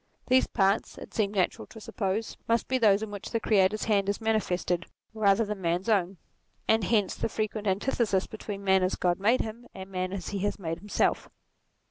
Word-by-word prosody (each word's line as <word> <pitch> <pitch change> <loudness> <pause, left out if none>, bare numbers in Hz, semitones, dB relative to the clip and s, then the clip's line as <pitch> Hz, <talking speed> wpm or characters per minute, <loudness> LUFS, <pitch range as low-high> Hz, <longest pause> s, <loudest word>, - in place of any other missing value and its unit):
These 260 +1 +5
parts 195 +2 +1
it - - -10
seemed 210 -2 0
natural 185 -2 0
to 220 - -12
suppose, 210 0 -3
must 230 0 +1
be 260 0 +1
those 210 -2 +4
in 215 - -5
which 205 -1 -7
the 230 - 0
Creator's 210 -1 +2
hand 200 -2 +1
is 200 - -1
manifested 185 -5 0 0.3
rather 215 0 +3
than 210 -1 -4
the - - -11
man's 175 +4 -1
own: 195 -3 +1 0.5
and 220 -1 +3
hence 205 -2 +2
the - - -2
frequent 215 -1 -3
antithesis 200 0 +1
between 205 -2 -7
man 190 -1 +4
as 185 0 +1
Grod 175 0 0
made 225 +6 +3
him, 230 +2 -7
and 190 0 -8
man 185 0 -2
as 190 -3 -5
he 200 - -3
has 205 +1 -1
made 165 -4 -4
himself. 205 +2 0
205 Hz, 200 wpm, -28 LUFS, 190-220 Hz, 0.5 s, These